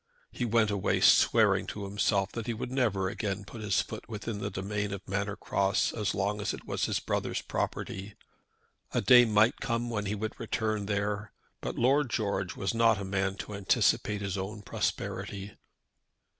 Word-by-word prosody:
He 120 - -2
went 110 -2 +3
away 100 -2 +1
swearing - - +5
to 105 - -5
himself 100 0 +1
that 115 -2 -5
he 120 - -1
would 120 +3 -5
never 110 -8 +1
again 100 0 -3
put 110 +2 -9
his 105 -2 +1
foot 110 - -9
within 110 -1 -4
the - - -2
domain 100 +1 -3
of 100 0 -7
Manor 100 +1 -1
Cross 100 +1 +1
as 105 -3 -1
long 105 +2 -1
as 105 - -1
it - - -13
was - - -1
his - - 0
brother's - - -2
property. 100 +1 -3 0.8
A - - +3
day 125 -1 +8
might 110 +3 +3
come 120 -2 -1
when 105 -3 -2
he 105 - -1
would 110 +4 -4
return 110 -3 -1
there; 105 0 -2 0.3
but - - -4
Lord 135 +2 +3
George 100 -5 -1
was 95 - -1
not 115 -2 +4
a 100 - -4
man 95 0 0
to 105 - -8
anticipate 100 +1 +2
his 100 -1 -2
own 105 +2 -5
prosperity. 100 +1 -3
105 Hz, 180 wpm, -30 LUFS, 100-110 Hz, 0.8 s, day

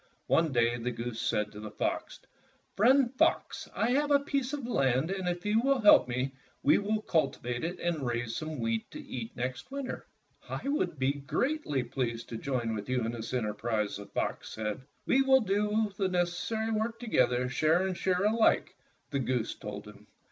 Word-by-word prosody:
One 165 -2 +3
day 120 -1 +2
the 120 +2 -2
goose 115 -1 -4
said 105 -2 0
to 105 - -10
the 105 0 -6
fox, - - -3 0.6
''Friend 250 +4 +4
Fox, 325 - +1
I 235 - +1
have 290 +3 +2
a 285 -1 +6
piece 275 -2 -1
of 290 -4 -4
land, 135 - +1
and 190 -2 -1
if 175 +1 -4
you 215 +2 +3
will 275 +1 +2
help 210 -10 +7
me, 130 +2 -1 0.3
we 145 - +5
will 210 +1 -1
cultivate 125 -6 0
it 175 +2 -3
and 170 -4 -1
raise 120 -2 -2
some 155 -1 -4
wheat 115 -1 -1
to - - -8
eat 120 -2 -6
next 125 - -4
winter." 275 -1 -5 0.4
"I - - -4
would 185 - 0
be 130 +1 +2
greatly 145 - -1
pleased 120 -2 -3
to 115 - -4
join 120 -2 -2
with 105 +2 -5
you 125 -3 +1
in 115 - -1
this 115 -1 -6
enterprise," 110 -2 -1
the 100 0 -9
fox - - -3
said. 110 +2 -3 0.2
"We 270 - +4
will 265 -1 +5
do 205 0 +1
all 215 -1 +1
the 195 -1 +1
necessary 185 +5 -1
work 225 +1 -1
to 240 - -6
gether, 125 - +2
share 155 +8 +2
and 190 -1 -1
share 185 +1 +1
alike," 220 +2 +3 0.4
the 140 - 0
goose 125 -3 -1
told 105 0 -7
him. 105 0 -14
150 Hz, 195 wpm, -30 LUFS, -, 0.6 s, help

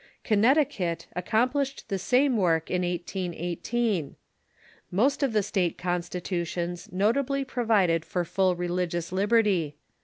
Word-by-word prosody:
Connecticut 215 - +2
ac 180 0 -3
complished 265 +5 0
the 195 -3 -2
same 255 +6 +3
work 165 -6 +1
in 180 - +1
1818. 175 - -2 0.7
Most 255 +12 +1
of 275 -3 +2
the 210 -2 +2
state 190 -4 -1
consti 180 0 -2
tutions 175 -1 -3
nobly 270 +9 +1
provided 210 -10 +2
for 175 0 -2
full 185 0 +1
religious 175 -1 -2
libeiHy. 195 -5 +2
185 Hz, 120 wpm, -27 LUFS, 175-230 Hz, 0.7 s, same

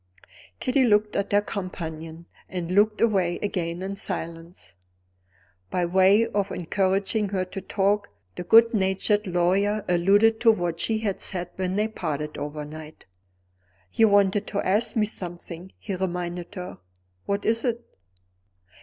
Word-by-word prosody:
Kitty 260 +1 +2
looked 210 -2 +2
at 200 - -1
her 205 0 +3
companion, 165 -5 -6 0.2
and 180 -2 -4
looked 210 +3 +3
away 190 -6 +2
again 175 -3 -2
in 195 +1 -4
silence. 170 -2 -6 1.0
By 180 -1 0
way 190 +5 +4
of 200 -3 -2
encouraging 195 +4 0
her 190 -2 -1
to 190 +1 -7
talk, 200 +2 0 0.3
the - - -5
good 230 +6 +6
natured 200 +1 +1
lawyer 190 +4 +1
alluded 200 +6 +4
to 230 -1 +7
what 175 -5 -2
she 220 +4 0
had 210 -3 -2
said 180 -2 -2
when 185 0 -2
they 210 +1 +1
parted 150 -8 -4
overnight. 150 +1 -7 0.9
"You 225 - +5
wanted 200 0 +3
to 200 - -2
ask 215 +4 +1
me 215 -2 +3
something," 175 -2 -7
he 200 - -6
reminded 180 0 -4
her. 180 -1 -7 0.5
"What 200 0 -1
is 225 +1 +1
it?" 240 -1 -2
190 Hz, 140 wpm, -25 LUFS, 175-210 Hz, 1.0 s, to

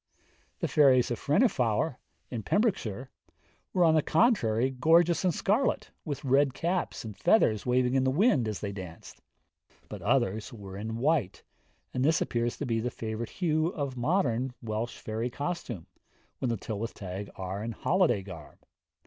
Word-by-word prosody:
The - - +1
fairies 130 -5 +4
of 120 - -2
Frennifawr, 140 - +1 0.3
in 120 -3 -3
Pembrokeshire, 130 - -1 0.6
were 180 - +3
on 160 -2 +5
the 155 - +4
contrary 135 - +2
gorgeous 165 +6 +3
in 185 - +3
scarlet, 210 - 0
with 145 -2 -4
red 135 0 +3
caps, 175 -6 -2
and 110 -2 -7
feathers 120 - +3
waving 125 0 +2
in 135 -1 +3
the 130 - +2
wind 155 - +3
as 105 -2 -4
they 100 - -3
danced. 90 -4 -10 0.7
But - - -7
others 105 +6 0
were 100 -5 -9
in 110 +3 -4
white, 135 - 0 0.5
and 125 - 0
this 160 +3 +3
appears 120 0 -1
to 145 - -3
be 115 -3 0
the 120 +2 -1
favourite 110 0 -5
hue 155 -3 0
of 140 -6 -3
modern 125 -3 0
Welsh 115 +1 -4
fairy 110 +3 -3
costume, 130 - -4 0.5
when 130 - -1
the 115 - 0
Tylwyth 110 +2 -5
Teg 95 +1 -6
are 95 +2 -4
in 115 - -3
holiday 175 - +2
garb. 85 -6 -10
125 Hz, 160 wpm, -29 LUFS, 110-155 Hz, 0.7 s, on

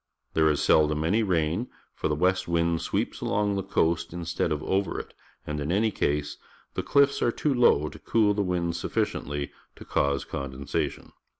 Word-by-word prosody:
There 80 -1 +4
is 75 - +1
seldom 75 0 +3
any 100 +8 +2
rain, 90 +2 0 0.2
for - - -2
the 75 - 0
west 90 +4 +1
wind 85 0 +1
sweeps - - -2
along 105 0 +1
the 100 - -1
coast 85 -4 0
instead 85 -1 -2
of 75 -1 -1
over 95 +1 0
it, - - -9 0.3
and, 75 0 -3
in 75 +2 -2
any 110 +4 +2
case, 75 -5 -1 0.4
the - - -1
chffs 140 0 +3
are 120 - +3
too 145 +4 0
low 120 - +4
to - - -9
cool 105 -3 +2
the 100 - 0
wind 90 -3 -1
sufficiently 75 -3 -2 0.2
to - - -12
cause 70 0 0
condensation. 70 0 -4
85 Hz, 180 wpm, -27 LUFS, 75-100 Hz, 0.4 s, There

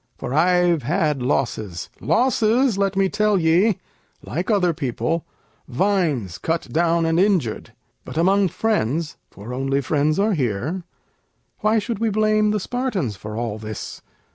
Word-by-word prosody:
For 125 - -5
I've 175 +1 +3
had 150 0 0
losses 110 -8 -2
losses, 230 - +2
let 195 0 0
me 195 0 +3
tell 210 +1 +2
ye, 180 +5 +3 0.5
Like 175 +6 -3
other 185 -6 +3
people; 155 +4 -2 0.4
vines 150 - 0
cut 165 0 -2
down 170 +1 +2
and 165 +1 +2
injured. 180 - 0 0.3
But - - -8
among 195 +4 +3
friends 165 - -1
(for 105 +6 -9
only 135 +2 0
friends 150 +2 +1
are 205 +2 +2
here), 145 - -2 0.7
Why 215 +1 +2
should 220 0 -2
we 225 0 +1
blame 215 0 +2
the 210 0 +1
Spartans 205 - -2
for 105 +3 -7
all 115 -2 -3
this? 110 -1 -7
170 Hz, 140 wpm, -22 LUFS, 135-205 Hz, 0.7 s, I've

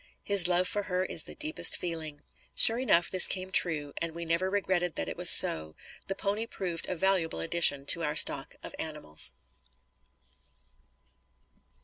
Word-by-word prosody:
His 200 -4 +3
love 180 0 0
for 205 - -4
her 180 0 -2
is 165 -3 -2
the - - -11
deepest 310 +1 +1
feeling." 160 -4 -6 0.3
Sure 230 +2 +7
enough 175 -10 +2
this 185 -1 +7
came 185 0 -2
true, 150 -6 0
and 165 -1 -4
we 170 0 -7
never 170 +3 -2
regretted 190 -4 -2
that 80 - -5
it - - -7
was - - 0
so. 80 0 +4 0.3
The 195 - -4
pony 205 +3 -4
proved 175 -7 -5
a 185 - -4
valuable 180 - -1
addition 140 - +2
to 170 - +3
our 150 -1 -3
stock 140 -2 0
of - - -10
animals. 150 - -5
175 Hz, 160 wpm, -27 LUFS, 155-190 Hz, 0.3 s, Sure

